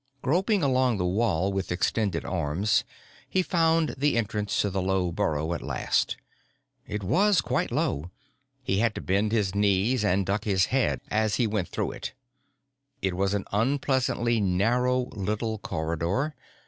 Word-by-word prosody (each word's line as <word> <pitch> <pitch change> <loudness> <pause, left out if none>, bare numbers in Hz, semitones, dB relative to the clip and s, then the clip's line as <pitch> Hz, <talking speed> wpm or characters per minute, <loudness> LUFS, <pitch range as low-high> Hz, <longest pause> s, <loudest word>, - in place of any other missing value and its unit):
Groping 185 +6 +2
along 130 -4 +2
the 90 - -1
wall 95 -1 +1
with 95 -1 -2
extended 95 0 0
arms, 90 +4 +1 0.5
he 185 - +2
found 165 -3 +2
the 145 -3 +2
entrance 105 -2 -1
to 100 - -1
the 95 0 -1
low 95 -1 0
burrow 80 0 -1
at - - -4
last. - - 0 0.7
It 105 -1 -4
was 195 - +3
quite - - 0
low 75 +5 -1 0.5
he 95 -6 0
had 115 -1 +1
to - - -4
bend 100 +3 +1
his 105 -5 +1
knees 105 +4 +2
and 100 -1 +2
duck 100 +2 -1
his 95 -4 +3
head 135 -2 +1
as 110 -1 +1
he 120 - +2
went 105 -4 -1
up - - -27
to. - - -1 1.1
It 95 -1 +1
was 95 +2 +1
an 100 - -2
unpleasantly 125 0 +1
narrow 120 +7 +2
little 105 +2 -2
corridor. 85 - -2
105 Hz, 155 wpm, -27 LUFS, 95-125 Hz, 1.1 s, was